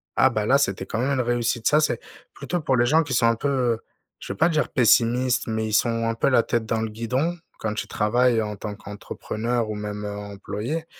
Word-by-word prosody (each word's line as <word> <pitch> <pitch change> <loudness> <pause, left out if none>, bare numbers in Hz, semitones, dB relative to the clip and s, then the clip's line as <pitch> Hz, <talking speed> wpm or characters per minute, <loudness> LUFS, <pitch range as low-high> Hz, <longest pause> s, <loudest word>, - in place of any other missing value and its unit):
ah, 130 - +5
bah, 110 -4 -1
là, 135 +5 +5
c'était 95 -8 -1
quand 115 - -3
même 130 +3 0
une - - +4
réussite. 120 -1 0
Ça, 150 +1 +4
c'est 135 -6 0 0.3
plutôt 175 -2 -3
pour 135 -3 +1
les 120 - +4
gens 160 +6 +4
qui 145 - -4
sont 120 -1 +3
un 115 - +3
peu, 140 +5 -2
heu, 125 -4 +1 0.4
je - - -7
veux - - -13
pas - - +4
dire 155 -5 0
pessimistes, 125 +2 +3
mais 110 0 -1
ils 110 - -4
sont 115 0 +2
un 115 - -1
peu 125 - +2
la 125 -3 +4
tête 120 -1 -1
dans 110 0 -1
le 110 - -1
guidon. 125 +10 -1 0.2
Quand 110 -1 -2
tu - - -4
travailles 120 +2 +2
en 105 -1 -4
tant 105 +1 -6
qu'entrepreneur 110 +3 -4
ou 105 - -3
même, 105 0 -5
heu, 100 0 -5
employé. 105 +9 -5
115 Hz, 240 wpm, -24 LUFS, 110-130 Hz, 0.4 s, ah